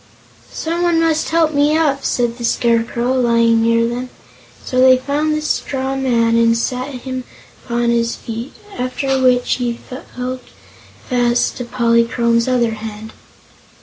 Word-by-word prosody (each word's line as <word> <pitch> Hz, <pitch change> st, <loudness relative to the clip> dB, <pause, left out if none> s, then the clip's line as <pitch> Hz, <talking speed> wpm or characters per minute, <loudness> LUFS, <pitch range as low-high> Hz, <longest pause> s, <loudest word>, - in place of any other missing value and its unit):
"Someone 340 Hz, +1 st, 0 dB
must 325 Hz, -1 st, +1 dB
help 320 Hz, -1 st, +2 dB
me 295 Hz, +2 st, +3 dB
up," 280 Hz, -4 st, +1 dB
said 240 Hz, 0 st, -1 dB
the -, -, -6 dB
Scarecrow, 235 Hz, +1 st, +1 dB
lying 230 Hz, -2 st, +3 dB
near 230 Hz, 0 st, +2 dB
them; 245 Hz, +2 st, -4 dB, 0.6 s
so 255 Hz, -, -1 dB
they 260 Hz, 0 st, +7 dB
found 295 Hz, +4 st, -1 dB
the 305 Hz, -, -3 dB
straw 270 Hz, -3 st, -2 dB
man 235 Hz, -4 st, +1 dB
and 230 Hz, 0 st, +3 dB
sat 250 Hz, +2 st, -2 dB
him 255 Hz, +1 st, -5 dB, 0.4 s
upon 235 Hz, 0 st, 0 dB
his 235 Hz, 0 st, 0 dB
feet, 230 Hz, +3 st, -7 dB, 0.3 s
after 265 Hz, +1 st, -1 dB
which 250 Hz, -1 st, +2 dB
he 240 Hz, -2 st, -3 dB, 0.4 s
held 255 Hz, +1 st, -4 dB, 0.7 s
fast 245 Hz, -1 st, +1 dB
to 245 Hz, -, -5 dB
Polychrome's 235 Hz, 0 st, +1 dB
other 245 Hz, -3 st, +1 dB
hand. 220 Hz, 0 st, -8 dB
245 Hz, 140 wpm, -17 LUFS, 235-265 Hz, 0.7 s, they